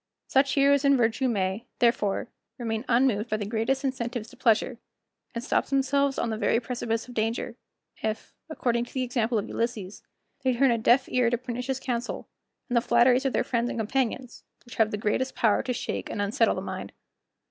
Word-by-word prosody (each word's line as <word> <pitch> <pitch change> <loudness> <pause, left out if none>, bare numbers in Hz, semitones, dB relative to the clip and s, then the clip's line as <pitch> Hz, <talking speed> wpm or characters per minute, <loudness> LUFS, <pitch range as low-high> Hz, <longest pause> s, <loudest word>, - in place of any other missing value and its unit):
Such 270 0 +2
heroes 280 0 +4
in 280 -1 +5
virtue 240 +2 +1
may, 200 0 -1
therefore, 230 -3 +1 0.3
remain 225 -1 -3
unmoved 235 -3 +2
by 215 - 0
the 210 - -3
greatest 230 +6 0
incentives 240 -3 -3
to - - -14
pleasure, 235 0 +2 0.6
and 235 - -3
stop - - +1
themselves 275 0 +1
on 230 - -1
the 220 - -3
very 230 - +2
precipice 235 -2 -3
of 250 - -10
danger; 225 0 -2 0.5
if, 220 0 -3 0.2
according 240 -6 0
to - - -16
the 260 - +1
example 240 -2 0
of 205 - -2
Ulysses, 220 -5 -3 0.4
they 260 -2 +2
turn 265 +1 +4
a 230 - +1
deaf 245 +4 +4
ear 250 -2 +2
to 240 - +1
pernicious 250 +1 -4
counsel, 245 -2 -3 0.4
and 245 - -2
the 235 - +5
flatteries 245 +3 +4
of 270 - +1
their - - +2
friends 235 0 0
and - - -4
companions, 250 +2 -2 0.2
which 240 -2 -11
have 220 -1 +4
the 210 - -3
greatest 220 +5 -1
power 220 -3 +3
to 255 - -3
shake 245 - -3
and - - -4
unsettle 205 +3 +2
the - - -3
mind. - - -6
240 Hz, 195 wpm, -27 LUFS, 225-260 Hz, 0.6 s, in